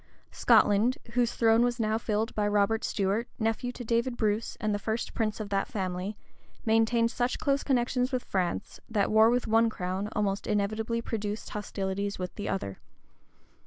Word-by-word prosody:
Scotland, 210 Hz, +5 st, +4 dB
whose 240 Hz, -1 st, +1 dB
throne 225 Hz, 0 st, +4 dB
was 245 Hz, 0 st, 0 dB
now 215 Hz, -1 st, +1 dB
filled 220 Hz, 0 st, -1 dB
by 210 Hz, -1 st, 0 dB
Robert 205 Hz, +2 st, +2 dB
Stuart, 205 Hz, +3 st, 0 dB
nephew 225 Hz, +2 st, -1 dB
to 245 Hz, -, -7 dB
David 235 Hz, +2 st, 0 dB
Bruce, 215 Hz, 0 st, -1 dB
and 215 Hz, -1 st, 0 dB
the 205 Hz, -, -1 dB
first 220 Hz, +3 st, -3 dB
prince 215 Hz, -2 st, -1 dB
of 210 Hz, -2 st, -5 dB
that 195 Hz, -1 st, 0 dB
family, 190 Hz, -4 st, -3 dB, 0.5 s
maintained 230 Hz, +1 st, +3 dB
such 245 Hz, 0 st, -1 dB
close 280 Hz, -1 st, +1 dB
connections 250 Hz, -1 st, +1 dB
with 255 Hz, -2 st, -1 dB
France, 180 Hz, -, -2 dB
that 210 Hz, -3 st, +1 dB
war 220 Hz, +1 st, +6 dB
with 245 Hz, +1 st, +1 dB
one 225 Hz, +1 st, +4 dB
crown 190 Hz, 0 st, -3 dB
almost 200 Hz, -1 st, -1 dB
inevitably 215 Hz, +3 st, -1 dB
produced 210 Hz, -2 st, -4 dB
hostilities 200 Hz, -1 st, -3 dB
with 180 Hz, -1 st, -5 dB
the 205 Hz, -, -4 dB
other. 100 Hz, -, -3 dB
220 Hz, 165 wpm, -29 LUFS, 205-235 Hz, 0.5 s, war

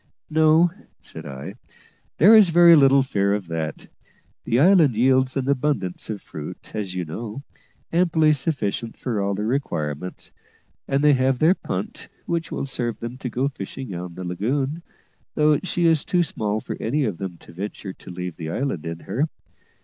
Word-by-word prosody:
"No," 160 Hz, +2 st, +5 dB, 0.3 s
said -, -, -10 dB
I, 70 Hz, -1 st, -7 dB, 0.6 s
"there 210 Hz, +7 st, +8 dB
is 210 Hz, -5 st, +7 dB
very 170 Hz, 0 st, +7 dB
little 135 Hz, -2 st, +6 dB
fear 100 Hz, -6 st, +1 dB
of 100 Hz, -2 st, -4 dB
that. 80 Hz, -2 st, -4 dB, 0.6 s
The 120 Hz, -, +2 dB
island 160 Hz, -, +5 dB
yields 130 Hz, +3 st, +3 dB
an 135 Hz, -1 st, -1 dB
abundance 135 Hz, -10 st, -1 dB
of 105 Hz, -2 st, -5 dB
fruit, -, -, -9 dB
as 100 Hz, -4 st, -4 dB
you 90 Hz, -1 st, -2 dB
know, 110 Hz, -, -6 dB, 0.5 s
amply 160 Hz, -3 st, +4 dB
sufficient 125 Hz, -6 st, -2 dB
for 115 Hz, -5 st, -2 dB
all 100 Hz, 0 st, 0 dB
their 105 Hz, +2 st, -3 dB
requirements; 90 Hz, -, -3 dB, 0.6 s
and 140 Hz, +1 st, +1 dB
they 150 Hz, -1 st, +6 dB
have 130 Hz, 0 st, +2 dB
their 160 Hz, +7 st, +5 dB
punt, -, -, -5 dB, 0.2 s
which 170 Hz, -1 st, -2 dB
will -, -, -3 dB
serve 120 Hz, -4 st, -3 dB
them 120 Hz, +2 st, -6 dB
to 125 Hz, -, -4 dB
go 130 Hz, +4 st, 0 dB
fishing 130 Hz, -2 st, -7 dB
on 90 Hz, 0 st, -6 dB
the 90 Hz, -, -6 dB
lagoon, 130 Hz, -, -2 dB, 0.5 s
though 150 Hz, 0 st, +4 dB
she 175 Hz, -2 st, -1 dB
is 165 Hz, -3 st, +3 dB
too 180 Hz, -1 st, +2 dB
small 110 Hz, -8 st, -2 dB
for -, -, -6 dB
any 140 Hz, +6 st, 0 dB
of 100 Hz, -6 st, -3 dB
them 95 Hz, -3 st, -5 dB
to 85 Hz, -, -16 dB
venture 95 Hz, +1 st, -6 dB
to -, -, -14 dB
leave 90 Hz, -1 st, -6 dB
the 80 Hz, -2 st, -5 dB
island 90 Hz, -, -2 dB
in 85 Hz, 0 st, -5 dB
her. 145 Hz, +6 st, -1 dB
125 Hz, 175 wpm, -23 LUFS, 95-150 Hz, 0.6 s, there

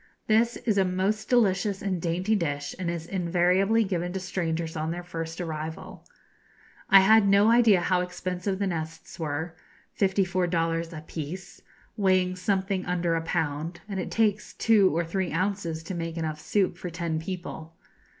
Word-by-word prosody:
This 230 Hz, +2 st, +3 dB
is 215 Hz, -4 st, 0 dB
a -, -, +5 dB
most 190 Hz, +4 st, -1 dB
delicious 200 Hz, -4 st, +2 dB
and 185 Hz, -3 st, -2 dB
dainty 180 Hz, +6 st, 0 dB
dish, 145 Hz, -6 st, -2 dB
and 180 Hz, -2 st, -2 dB
is 170 Hz, -1 st, -4 dB
invariably 185 Hz, +4 st, +2 dB
given 175 Hz, -3 st, -2 dB
to 190 Hz, -, -2 dB
strangers 170 Hz, -3 st, -3 dB
on 155 Hz, 0 st, -2 dB
their 175 Hz, +1 st, -4 dB
first 165 Hz, -1 st, -6 dB
arrival. 160 Hz, -2 st, -6 dB, 0.9 s
I 195 Hz, -, +9 dB
had 215 Hz, +1 st, +6 dB
no 200 Hz, +3 st, +5 dB
idea 230 Hz, -6 st, +5 dB
how 180 Hz, +1 st, +2 dB
expensive 180 Hz, +1 st, -3 dB
the 200 Hz, -, -1 dB
nests 165 Hz, -1 st, -5 dB
were 160 Hz, +1 st, -3 dB, 0.4 s
54 190 Hz, -2 st, +1 dB
dollars 165 Hz, -1 st, -1 dB
a 155 Hz, -2 st, -7 dB
'pice,' 160 Hz, +4 st, -7 dB, 0.4 s
weighing 185 Hz, -2 st, +2 dB
something 190 Hz, 0 st, -1 dB
under 175 Hz, -1 st, 0 dB
a 165 Hz, -, 0 dB
pound, 160 Hz, 0 st, -2 dB
and 195 Hz, -2 st, -4 dB
it 185 Hz, -, -3 dB
takes 210 Hz, -2 st, 0 dB
two 210 Hz, -4 st, +4 dB
or 170 Hz, +3 st, 0 dB
three 185 Hz, +2 st, -2 dB
ounces 175 Hz, -2 st, -2 dB
to 175 Hz, -, -6 dB
make 165 Hz, -1 st, -4 dB
enough 155 Hz, -2 st, -3 dB
soup 195 Hz, -4 st, 0 dB
for 180 Hz, -, -5 dB
ten 165 Hz, -1 st, -2 dB
people. 165 Hz, -2 st, -7 dB
180 Hz, 165 wpm, -27 LUFS, 165-195 Hz, 0.9 s, I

